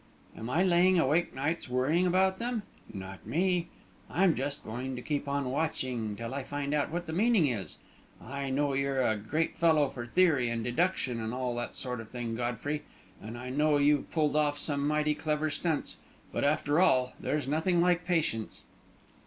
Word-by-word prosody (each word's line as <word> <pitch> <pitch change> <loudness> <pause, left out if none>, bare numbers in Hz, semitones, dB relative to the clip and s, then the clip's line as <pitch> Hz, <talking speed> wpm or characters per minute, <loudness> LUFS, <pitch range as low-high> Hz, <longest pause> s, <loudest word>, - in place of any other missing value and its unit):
Am 115 +2 -6
I 165 +8 +2
laying 180 0 +4
awake 160 +1 +2
nights 145 +2 -2
worrying 145 +9 +2
about 190 +1 +2
them? 235 -2 -2 0.3
Not 95 0 -8
me! 175 +1 +1 0.4
I'm 185 -1 +3
just 140 +2 -3
going 125 +4 -4
to 125 - -5
keep 145 -2 -2
on 140 -2 -1
watching 130 -7 -2
till 115 +4 -5
I 140 - -2
find 145 +2 -3
out 150 -1 +1
what 175 +2 -3
the 160 - -5
meaning 210 -1 +4
is. 105 - -3 0.4
I 140 +3 -5
know 140 +1 +1
you're 135 -1 +1
a 110 - +2
great 150 +11 -2
fellow 160 -4 +4
for 120 -3 -7
theory 145 -5 +3
and 115 -1 -2
deduction, 130 -2 0
and 110 +2 -3
all 125 -1 -1
that 120 - -4
sort 125 -3 -3
of 110 - -12
thing, 120 -2 -4
Godfrey, 125 +5 -2 0.4
and 115 +2 -7
I 125 +1 -6
know 150 +2 +3
you've 145 0 +3
pulled 150 -3 +1
off 150 -1 +2
some 145 -1 -1
mighty 150 0 +2
clever 155 0 -1
stunts; 160 +1 -2 0.3
but, - - -2
after 145 +1 +2
all, 130 -8 +3
there's 150 -3 -1
nothing 160 +5 +1
like 175 0 +3
patience." 160 -11 -1
145 Hz, 185 wpm, -30 LUFS, 125-165 Hz, 0.4 s, laying